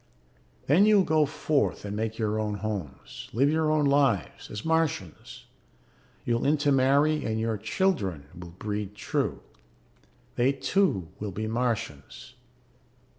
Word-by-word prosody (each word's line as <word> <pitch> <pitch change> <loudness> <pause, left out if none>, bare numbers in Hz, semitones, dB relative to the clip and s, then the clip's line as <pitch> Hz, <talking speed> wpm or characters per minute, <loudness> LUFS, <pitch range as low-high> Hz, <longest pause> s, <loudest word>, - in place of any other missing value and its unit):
"Then 180 +9 +5
you 215 - +6
will 195 - +5
go 155 -2 +3
forth 145 -5 -1
and 100 0 -4
make 110 +1 -3
your 110 -1 -1
own 105 -1 -2
homes, 100 -8 -6
live 135 +6 +3
your 160 0 +1
own 155 -1 +2
lives, 140 - +1
as 105 +5 -7
Martians. 160 - -2 0.8
You 120 -1 +1
will - - -3
intermarry 145 +1 +3
and 110 0 -2
your 115 0 -1
children 105 - -1
will 90 0 -9
breed 105 +3 -5
true. - - -2 0.9
They 130 +3 +3
too 135 - 0
will 105 - -4
be 110 +4 -4
Martians. 115 - -3
120 Hz, 135 wpm, -27 LUFS, 105-150 Hz, 0.9 s, you